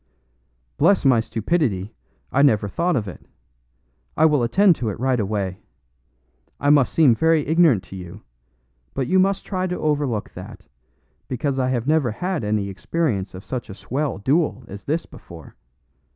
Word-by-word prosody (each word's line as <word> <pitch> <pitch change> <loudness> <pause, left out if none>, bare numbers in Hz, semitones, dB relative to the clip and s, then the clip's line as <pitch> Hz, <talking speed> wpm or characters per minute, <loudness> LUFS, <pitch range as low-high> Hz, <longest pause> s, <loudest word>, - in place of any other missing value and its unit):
"Bless 175 +2 +3
my 130 -4 +5
stupidity, 115 - -1 0.4
I 140 - +2
never 110 -8 +3
thought 170 - 0
of 110 -5 -1
it! 90 - -9 0.9
I - - +5
will 150 -4 +3
attend 180 - +4
to 115 - -2
it 100 - -6
right 130 -1 +1
away. 100 -3 -2 1.0
I 145 - +3
must 140 -5 +4
seem 150 -7 +5
very 160 +3 +2
ignorant 160 - +3
to - - -11
you; 90 +3 -10 0.7
but 135 - -1
you 185 +9 +2
must 195 +1 +1
try 185 -2 -2
to 180 - -3
overlook 145 -8 -1
that, - - -10 0.6
because 135 +1 -2
I 130 -1 +1
have 125 -2 -1
never 150 -3 +2
had 175 - -3
any 105 -1 -1
experience 100 - -2
of 95 - -10
such 125 -4 -5
a 95 - -8
swell 130 +7 -3
duel 135 - 0
as 100 0 -10
this 160 +4 -1
before. 80 -4 -13
130 Hz, 165 wpm, -22 LUFS, 105-160 Hz, 1.0 s, my